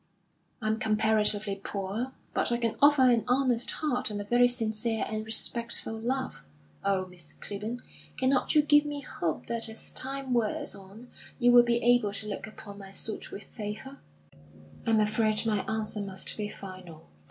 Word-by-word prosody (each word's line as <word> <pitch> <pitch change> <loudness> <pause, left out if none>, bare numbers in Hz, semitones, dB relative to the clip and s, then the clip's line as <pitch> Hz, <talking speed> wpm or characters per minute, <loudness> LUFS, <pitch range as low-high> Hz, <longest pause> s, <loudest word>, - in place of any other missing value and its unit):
I - - 0
am 220 +1 +1
comparatively 215 -2 +2
poor; 205 +6 -3 0.2
but - - +1
I 235 - +2
can 230 -2 0
offer 285 -1 +7
an 240 -3 +5
honest 250 -2 +2
heart 260 -7 -1
and 210 -1 -4
a - - -3
very 240 +4 +4
sincere 225 -2 -1
and 215 0 -3
respectful 225 +1 +1
love. 255 +4 -3 0.4
Oh, 195 -1 +1
Miss 175 -4 -11
Clibborn, 215 +4 -5 0.4
cannot 260 +3 +2
you 300 - +6
give 295 0 +6
me 290 -1 -4
hope 170 - -3
that 230 -1 -3
as 220 - -5
time 270 0 -2
wears 230 -3 0
on 200 +5 -12 0.3
you 245 -1 +5
will 245 0 +9
be 240 0 +2
able 240 -4 +4
to 210 +1 -2
look 205 0 -4
upon 205 -1 -10
my 195 -1 -9
suit 210 +2 -3
with 200 - -8
favour?" 220 +5 -7 0.9
"I'm 225 -1 +4
afraid 215 +1 +2
my 215 -2 +2
answer 215 -1 0
must 190 -1 -3
be 210 -1 -3
final." 185 -6 -10
220 Hz, 170 wpm, -29 LUFS, 205-245 Hz, 0.9 s, will